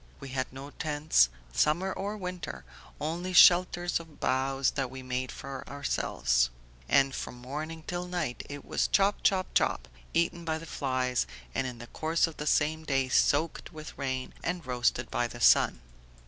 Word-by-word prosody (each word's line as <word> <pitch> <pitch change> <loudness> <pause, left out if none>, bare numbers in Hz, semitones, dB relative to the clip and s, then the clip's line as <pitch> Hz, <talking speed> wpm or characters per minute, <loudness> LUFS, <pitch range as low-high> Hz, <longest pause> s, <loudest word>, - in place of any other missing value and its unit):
We 140 - -8
had 130 0 -2
no 135 +2 -9
tents, 150 - +2 0.2
summer 170 - +2
or 205 +2 -4
winter, 180 - -6 0.3
only 170 +4 -3
shelters 175 +1 +6
of 160 -3 -14
boughs 135 +1 +1
that 135 -3 -2
we 130 0 -8
made 130 0 -2
for 135 -1 -7
ourselves. 65 - +1 0.4
And 135 -1 +4
from - - -5
morning 155 +6 -6
till 180 0 -3
night 175 -8 -3
it 145 -1 -7
was - - 0
chop, 200 +1 +2
chop, 190 -2 +1
chop, - - +1 0.2
eaten 170 0 +1
by 160 -1 -1
the 160 - -9
flies, 130 -5 -1 0.3
and 130 - 0
in 125 -2 -6
the 120 - -9
course 160 +7 +1
of 165 -2 -8
the 150 - -4
same 155 +2 +2
day 135 -4 0
soaked 150 +5 +2
with 155 -1 -9
rain 130 -2 -3
and 170 0 -2
roasted 125 -1 0
by 120 - +1
the 120 - -10
sun." 85 - +5
145 Hz, 170 wpm, -29 LUFS, 130-165 Hz, 0.4 s, shelters